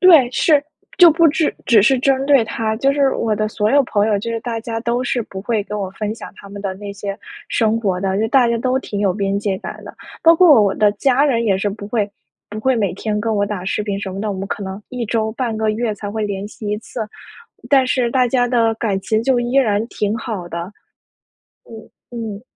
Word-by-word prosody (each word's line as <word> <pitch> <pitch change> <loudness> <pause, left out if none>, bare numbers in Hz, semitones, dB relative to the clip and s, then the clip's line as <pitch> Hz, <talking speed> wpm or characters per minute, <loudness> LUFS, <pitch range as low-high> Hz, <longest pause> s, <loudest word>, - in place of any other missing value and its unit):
对， 320 -10 +7
是， 290 +2 +3 0.4
就 350 -2 +9
不 330 +2 +4
只 310 +1 0
只 225 -5 +5
是 265 +5 +4
针 270 +1 +1
对 275 -5 +5
他， 220 0 -2
就 270 +4 +2
是 275 -1 +2
我 220 -2 0
的 215 0 -1
所 210 0 0
有 285 +2 +5
朋 205 -3 +1
友， 210 -2 +1
就 230 +3 -4
是 230 - -2
大 230 -1 -4
家 225 0 -4
都 235 +1 -1
是 245 -1 -1
不 195 -3 -8
会 215 0 -1
跟 210 +1 -5
我 195 -2 -3
分 210 +1 -3
享 - - -9
他 200 - -13
们 200 0 -8
的 195 -2 -3
那 200 +1 -7
些 200 0 -6 0.3
生 225 -1 +1
活 190 -5 -1
的， 190 0 -1
就 220 - +1
大 255 +1 +4
家 235 - +1
都 255 +2 0
挺 205 -6 -5
有 195 -3 +2
边 200 0 -1
界 200 -2 -1
感 - - -8
的。 - - -10 0.3
包 330 0 +7
括 310 - +7
我 195 -1 +1
的 210 -1 +3
家 270 +4 +2
人 235 -5 +1
也 195 -4 +2
是 200 +2 -1
不 205 0 -8
会 210 -2 0 0.4
不 210 +1 -6
会 260 +2 +2
每 200 -5 0
天 210 +2 -3
跟 225 +1 -1
我 205 -1 +1
打 200 -3 -5
视 200 - -1
频 200 -1 -3
什 190 -2 -5
么 195 - -5
的， 215 0 -2
我 195 - -4
们 195 +1 -4
可 205 - -4
能 190 +1 -6
1 250 -2 -4
周 220 0 -1
半 230 -2 -2
个 220 0 +1
月 220 0 -1
才 205 0 -6
会 215 0 -2
联 200 -1 -4
系 210 0 -8
一 210 - 0
次， 225 +2 -8 0.7
但 270 -2 +4
是 255 -2 +1
大 255 0 +2
家 245 0 +2
的 230 -2 +2
感 210 -4 -2
情 220 +3 0
就 250 0 +2
依 240 +1 -3
然 220 -5 +2
挺 210 -1 -2
好 210 -6 -5
的。 170 +3 -6 0.9
嗯， 225 -1 -12 0.5
嗯。 205 - -13
220 Hz, 265 characters per minute, -19 LUFS, 205-245 Hz, 0.9 s, 就